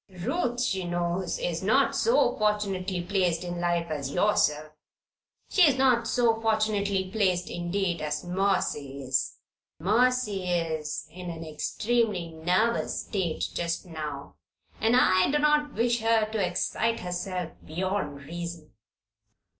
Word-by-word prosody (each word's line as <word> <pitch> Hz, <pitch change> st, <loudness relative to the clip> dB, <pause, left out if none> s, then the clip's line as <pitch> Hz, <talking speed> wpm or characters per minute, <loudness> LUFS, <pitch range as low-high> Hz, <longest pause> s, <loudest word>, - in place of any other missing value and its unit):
Ruth, 240 Hz, -, -2 dB
she 190 Hz, -5 st, 0 dB
knows, 175 Hz, -, -1 dB
is -, -, -2 dB
not -, -, +3 dB
so 475 Hz, +2 st, +3 dB
fortunately 195 Hz, -4 st, 0 dB
placed 180 Hz, -3 st, 0 dB
in 175 Hz, -1 st, -4 dB
life 175 Hz, -1 st, +1 dB
as 140 Hz, -3 st, -3 dB
yourself. 155 Hz, -5 st, +2 dB, 0.8 s
She 385 Hz, -, +3 dB
is 290 Hz, -6 st, +6 dB
not 250 Hz, -3 st, +3 dB
so 230 Hz, -2 st, +2 dB
fortunately 205 Hz, -4 st, +1 dB
placed, 185 Hz, -4 st, +1 dB
indeed, 175 Hz, 0 st, -1 dB
as 150 Hz, -1 st, -2 dB
Mercy 175 Hz, -7 st, -1 dB
is. 130 Hz, 0 st, -1 dB, 0.4 s
And 165 Hz, -, -8 dB
Mercy 225 Hz, -3 st, +2 dB
is 160 Hz, -4 st, -2 dB
in 180 Hz, +1 st, -7 dB
an 165 Hz, -1 st, -6 dB
extremely 205 Hz, +3 st, -1 dB
nervous 180 Hz, +8 st, 0 dB
state 185 Hz, -6 st, -2 dB
just 170 Hz, +2 st, -2 dB
now, 150 Hz, -4 st, -7 dB, 0.4 s
and 225 Hz, +2 st, +3 dB
I 185 Hz, -7 st, +4 dB
do 295 Hz, -, +2 dB
not 300 Hz, -1 st, +2 dB
wish 235 Hz, +1 st, +2 dB
her 225 Hz, -1 st, +3 dB
to 220 Hz, -3 st, 0 dB
excite 225 Hz, +5 st, -1 dB
herself 180 Hz, -1 st, -3 dB
beyond 175 Hz, -4 st, -3 dB
reason." 170 Hz, -1 st, -7 dB
185 Hz, 130 wpm, -27 LUFS, 170-220 Hz, 0.8 s, is